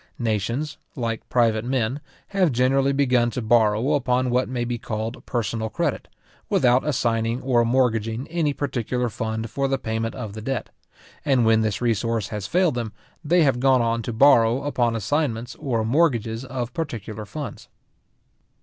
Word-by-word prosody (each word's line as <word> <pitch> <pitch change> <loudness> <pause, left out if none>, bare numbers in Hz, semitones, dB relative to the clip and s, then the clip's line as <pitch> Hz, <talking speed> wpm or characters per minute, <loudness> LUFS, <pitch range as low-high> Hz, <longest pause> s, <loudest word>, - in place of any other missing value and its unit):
Nations, 120 +7 -2 0.2
like 115 -3 -3
private 115 -3 +2
men, 125 +2 -1 0.3
have 190 -5 +2
generally 135 +3 +2
begun 125 -4 +2
to 120 - -4
borrow 110 +4 +3
upon 125 -2 +1
what 125 +1 +1
may 125 -2 -2
be 120 0 -3
called 110 +1 -4
personal 115 -2 -2
credit, - - -2 0.4
without 125 +1 +3
assigning 115 -4 0
or 125 -3 +3
mortgaging 115 -1 +1
any 160 -3 0
particular 125 -3 -2
fund 110 0 -4
for 140 0 0
the 135 0 0
payment 115 -2 -3
of 110 -6 -6
the 110 - -7
debt; 135 +3 -3 0.5
and 130 -5 +3
when 110 0 +4
this 110 -1 -1
resource 115 -2 0
has 105 -3 -4
failed 180 -3 +2
them, 115 -3 -4 0.3
they 170 +2 +4
have 135 -4 +2
gone 130 -1 +4
on 115 0 0
to 120 - -4
borrow 120 0 +5
upon 120 -5 0
assignments 120 0 -1
or 115 -5 -1
mortgages 120 -4 +1
of 125 -2 -4
particular 110 - -5
funds. 140 +8 -7
120 Hz, 160 wpm, -23 LUFS, 115-135 Hz, 0.5 s, borrow